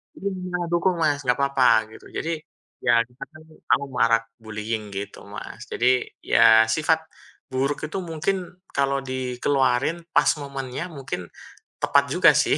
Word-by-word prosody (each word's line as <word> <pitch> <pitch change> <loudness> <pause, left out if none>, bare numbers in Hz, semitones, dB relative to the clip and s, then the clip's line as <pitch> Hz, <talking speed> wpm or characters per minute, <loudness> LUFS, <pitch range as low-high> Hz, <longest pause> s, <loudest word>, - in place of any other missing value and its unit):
Ini 200 - -5 0.2
malah 175 -1 -2
dukung 175 +1 +2
Mas, 145 -2 +2
nggak 125 0 +3
apa-apa 140 -2 +3 0.2
gitu. - - -14
Jadi, 165 - -2 0.5
ya 120 -1 +5
di 120 - -25
sana - - -6
kan 155 - -14 0.3
anu, 140 - +2
marak 115 -2 +4 0.2
bullying 110 0 -4
gitu 100 +1 -5
Mas. - - -8
Jadi, 125 +1 +2 0.2
ya 110 0 +6
sifat 160 +1 +2 0.5
buruk 135 +2 0
itu 155 - -5
mungkin 170 +2 -1 0.4
kalau 140 0 +2
dikeluarin 130 +2 0 0.2
pas - - +5
momennya, 135 -1 -5
mungkin, 130 -10 -5 0.5
tepat - - +4
juga - - +6
sih. - - +3
135 Hz, 150 wpm, -24 LUFS, 120-155 Hz, 0.5 s, ya